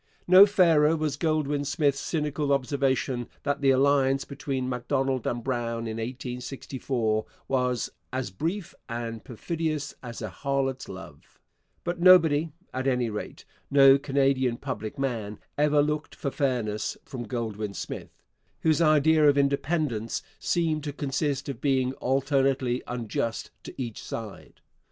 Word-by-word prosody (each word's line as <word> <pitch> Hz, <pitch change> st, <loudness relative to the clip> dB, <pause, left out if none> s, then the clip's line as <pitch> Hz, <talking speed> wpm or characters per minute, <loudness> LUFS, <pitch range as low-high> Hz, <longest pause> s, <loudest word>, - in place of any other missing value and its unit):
No 185 Hz, +3 st, +9 dB
fairer 165 Hz, -6 st, +4 dB
was 155 Hz, -2 st, -1 dB
Goldwin 150 Hz, -2 st, 0 dB
Smith's 145 Hz, -1 st, +1 dB
cynical 150 Hz, -3 st, -1 dB
observation 135 Hz, -2 st, 0 dB, 0.2 s
that 145 Hz, 0 st, -1 dB
the 135 Hz, -, +4 dB
alliance 135 Hz, 0 st, +3 dB
between 135 Hz, -2 st, -3 dB
Macdonald 130 Hz, 0 st, -1 dB
and 120 Hz, -1 st, -2 dB
Brown 115 Hz, -2 st, -2 dB
in 110 Hz, 0 st, -4 dB
1864 125 Hz, -1 st, -3 dB, 0.2 s
was 125 Hz, -2 st, 0 dB, 0.2 s
'as 130 Hz, -5 st, -3 dB
brief 170 Hz, -, -3 dB, 0.2 s
and 115 Hz, -1 st, -4 dB
perfidious 155 Hz, +3 st, -3 dB
as 120 Hz, -2 st, -7 dB
a 110 Hz, -, -4 dB
harlot's 135 Hz, +5 st, -2 dB
love'; 95 Hz, -7 st, -11 dB, 0.4 s
but 175 Hz, 0 st, -3 dB
nobody 165 Hz, -4 st, +6 dB, 0.2 s
at 130 Hz, +1 st, -2 dB
any 125 Hz, -3 st, +1 dB
rate, 105 Hz, -, -6 dB, 0.2 s
no 135 Hz, -1 st, +7 dB
Canadian 135 Hz, -3 st, +1 dB
public 125 Hz, -6 st, -5 dB
man 115 Hz, -6 st, -2 dB, 0.2 s
ever 145 Hz, 0 st, +3 dB
looked 150 Hz, +1 st, -2 dB
for 140 Hz, -, -3 dB
fairness 120 Hz, -7 st, -1 dB
from 120 Hz, -3 st, -6 dB
Goldwin 110 Hz, -4 st, -3 dB
Smith, -, -, -7 dB, 0.4 s
whose 160 Hz, -1 st, +3 dB
idea 155 Hz, -1 st, +5 dB
of 145 Hz, -, +3 dB
independence 140 Hz, -4 st, 0 dB, 0.2 s
seemed 160 Hz, -3 st, 0 dB
to 145 Hz, -, -3 dB
consist 145 Hz, 0 st, -2 dB
of 135 Hz, -5 st, -5 dB
being 130 Hz, -2 st, +1 dB
alternately 135 Hz, -1 st, +1 dB
unjust 115 Hz, -1 st, -3 dB
to -, -, -9 dB
each 120 Hz, -4 st, -4 dB
side. 110 Hz, -3 st, -8 dB
135 Hz, 130 wpm, -27 LUFS, 120-145 Hz, 0.4 s, No